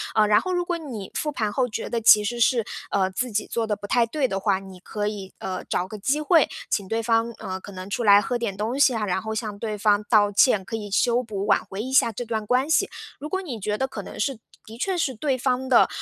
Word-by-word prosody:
呃， 215 - +5
然 210 0 +5
后 370 - -3
如 355 0 +1
果 350 0 -2
你 245 - -7
复 305 - -2
盘 215 -7 -2
后 255 +3 +1
觉 225 -1 -5
得 235 - -1
其 215 -1 +7
实 240 +3 -3
是， 235 -1 +3 0.3
呃， 190 -1 +1
自 250 +6 -2
己 210 +1 0
做 230 -1 -2
的 210 - 0
不 205 - -9
太 235 +3 +3
对 265 +4 -1
的 195 - -2
话， 195 -1 +1
你 190 -1 -12
可 205 +3 -4
以， 200 -3 -6
呃， 185 -1 -4
找 180 - -1
个 215 +3 -8
机 270 +9 0
会， 315 0 +4 0.2
请 200 -2 -1
对 225 +3 -1
方， 230 0 +1
呃， 190 0 -5
可 200 +1 -11
能 185 +1 -8
出 200 - -2
来 200 -2 +7
喝 245 +4 -2
点 230 -5 -3
东 220 +6 -2
西 275 -3 +5
啊， 215 -2 -1
然 190 0 -1
后 220 +1 -4
向 215 -2 -4
对 215 0 -4
方 205 0 +2
道 205 -2 +4
歉， 210 -1 +4
可 210 - -5
以 210 -2 -5
修 240 +4 +2
补， 205 -4 -4
挽 - - +3
回 195 +2 -6
一 260 - -5
下 230 - +5
这 240 +3 -5
段 220 -2 -3
关 255 +6 +1
系。 355 +5 +3 0.3
如 300 - -5
果 380 +3 -1
你 265 - -6
觉 210 +1 -2
得 265 - 0
可 220 - -6
能 - - -10
是 250 +2 -1 0.3
的 225 +1 -11
确 375 +9 -1
是 275 -7 0
对 270 +4 0
方 255 0 -1
的， 250 - +5
220 Hz, 290 characters per minute, -24 LUFS, 205-250 Hz, 0.3 s, 其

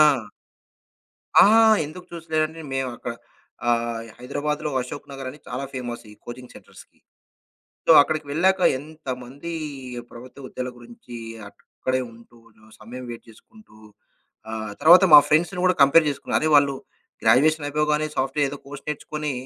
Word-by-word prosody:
ఆ! 140 -7 +4 1.2
ఆ! - - +8 0.4
ఎందుకు 160 +5 -10
చూసలేనంటే 160 -1 -2
మేము 135 -1 -1
అక్కడ 120 - -6 0.5
ఆహ్, 115 -1 -1
హైదరాబాద్‌లో 150 +4 -3
అశోక్ 125 +3 -8
నగర్ 135 -1 -7
అని 150 - -14
చాలా 125 +3 -4
ఫేమస్ 120 -3 -6
ఈ - - -14
కోచింగ్ 125 +1 -10
సెంటర్స్‌కి. - - -16 0.9
సో, - - +3
అక్కడికి 155 0 -3
వెళ్ళాక 190 +5 +2 0.2
ఎంతమంది 140 0 -8 0.6
ప్రభుత్వ 130 +3 -11
ఉద్యోగలు 125 0 -5
గురించి 120 0 -12 0.3
అక్కడే 130 +5 -4
ఉంటూ 115 +1 -18 0.2
జ - - -27 0.2
సమయం 125 +4 -9
వెయిట్ 120 0 -10
జేసుకుంటూ 215 - -19 0.7
ఆహ్, 110 -1 -5
తర్వాత 175 +4 +8
మా 150 - +12
ఫ్రెండ్స్‌ని 175 +4 +1
కూడా 185 -1 +4
కంపేర్ 150 +3 +6
జేసుకున్నారు. 140 - -1
"అరే! 155 - +1
వాళ్ళు 140 -1 +3 0.5
గ్రాడ్యుయేషన్ 145 +7 +3
అయిపోగానే 150 +1 0
సాఫ్ట్‌వేర్ 135 +2 0
ఏదో 145 - -7
కోర్స్ 140 0 -10
నేర్చుకొని" 150 0 -4
140 Hz, 135 wpm, -23 LUFS, 125-155 Hz, 1.2 s, మా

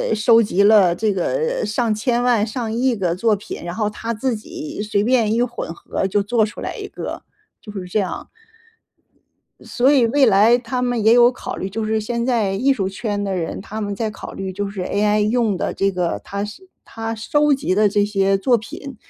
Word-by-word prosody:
收 225 +2 +5
集 200 -2 +1
了 200 -5 +5
这 215 +2 0
个 480 - -1
上 220 +1 0
千 240 +3 0
万 240 -4 +3
上 225 0 -4
亿 245 +2 +1
个 180 -5 -1
作 215 +3 +2
品， 200 - -8
然 175 0 -5
后 215 -2 0
它 225 +2 -4
自 235 +2 -1
己 310 +3 -7
随 205 -1 0
便 230 -2 +2
一 235 - +1
混 240 -8 -3
合 190 - -3
就 200 +1 +1
做 220 +1 +2
出 210 - -9
来 - - -4
一 - - -6
个， - - -7 0.4
就 210 - -10
是 195 -3 -6
这 180 +4 -1
样。 185 -4 -4 1.3
所 260 +3 +2
以 260 -5 +4
未 270 +4 +3
来 220 +3 +5
他 250 +1 -3
们 245 -2 0
也 220 - +6
有 240 0 +6
考 250 - -7
虑， 190 - -4
就 220 +3 -3
是 220 0 0
现 235 +2 -2
在 225 -6 +1
艺 255 +8 +2
术 195 -7 -1
圈 205 +1 -3
的 195 -1 -2
人， 165 -2 -4
他 215 +3 -7
们 205 -1 -3
在 220 +1 -2
考 215 - -9
虑 190 -1 -5
就 200 +2 -3
是 200 -2 -5
AI 210 +3 +1
用 215 -1 +1
的 - - -2
这 195 0 0
个 180 -2 -2
它 200 +1 -4 0.4
它 225 0 -5
收 295 +6 +2
集 270 -8 -2
的 210 +2 +4
这 205 +1 +2
些 195 -1 +1
作 240 +5 +2
品 265 +5 -9
215 Hz, 230 characters per minute, -20 LUFS, 200-240 Hz, 1.3 s, 也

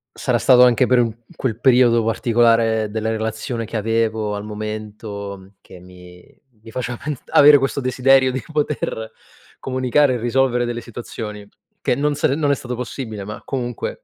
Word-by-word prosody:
Sarà 125 -2 0
stato 125 -1 +6
anche 125 +1 +3
per 125 -1 +4
un 115 -2 0 0.2
quel 115 -4 -3
periodo 120 -3 +4
particolare 115 -1 +2
della 110 +1 -2
relazione 110 +2 -3
che 115 +1 -5
avevo 110 -1 -1
al 100 - -5
momento 105 -2 -7
che 90 - -14
mi 90 0 -16 0.2
mi - - -12
faceva 120 +1 -4
pens 150 -3 -5
avere 145 0 +7
questo 135 +1 -1
desiderio 130 0 +3
di 130 - -4
poter 145 -7 -2 0.5
comunicare 130 +1 +1
e - - -1
risolvere 120 +1 +1
delle 120 0 -4
situazioni, 110 -3 -8 0.3
che - - +1
non 145 +1 0
se 140 -1 0
non 145 -2 +1
è - - +3
stato 125 -2 -6
possibile, 115 -4 -6
ma 105 +2 -8
comunque, 120 -3 -5
120 Hz, 165 wpm, -20 LUFS, 110-130 Hz, 0.5 s, avere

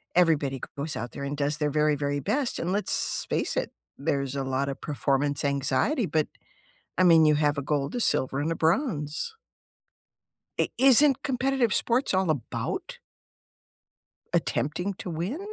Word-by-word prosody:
Everybody 150 -7 +2 0.2
goes 150 +2 -3
out 120 +2 -5
there 140 - -7
and 140 +1 -3
does 145 +1 0
their 150 -1 0
very, 150 0 +2
very 145 0 -1
best, 260 - -1
and 170 - -2
let's 205 +2 0
face - - 0
it, - - -1 0.3
there's 140 -2 -1
a 135 - -1
lotta 135 +1 -1
performance 140 -1 -1
anxiety, 140 - +1
but 155 -1 0 0.7
I 185 - +4
mean, 165 -3 +6
you 150 -1 +5
have 145 -1 +1
a - - -3
gold, 140 0 -1
a - - -1
silver, 135 - +1
and 155 +3 -1
a - - -1
bronze. 165 - -1 1.2
I - - +2
Isn't 270 +2 +5
competitive 265 -4 +1
sports 240 +4 +1
all 190 -2 +1
about 145 -6 -3 1.4
attempting 180 +7 -1
to 180 - -6
win? 175 - -3
155 Hz, 155 wpm, -27 LUFS, 140-195 Hz, 1.4 s, mean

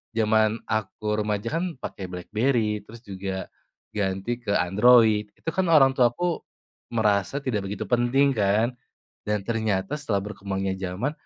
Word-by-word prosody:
zaman 110 -1 +3 0.2
aku 110 0 -3 0.2
remaja 105 +1 -2
kan - - -1 0.2
pakai 95 - -5
Blackberry, 105 +3 0
terus 115 +1 -12
juga 95 -2 -5 0.4
ganti 100 +3 -2
ke 105 -4 -2
Android, 105 +3 +5
itu 165 - -5
kan 185 +3 0
orang 140 -5 +6
tuaku 130 +8 +1 0.5
merasa 105 +4 +1
tidak 110 -7 -2
begitu 100 0 -4
penting 125 +3 +3
kan, 105 +3 +3 0.6
dan 105 -1 0
ternyata 110 -2 -1
setelah 105 -9 -1
berkembangnya 95 -2 -3
zaman 95 +9 -2
110 Hz, 135 wpm, -25 LUFS, 100-120 Hz, 0.6 s, orang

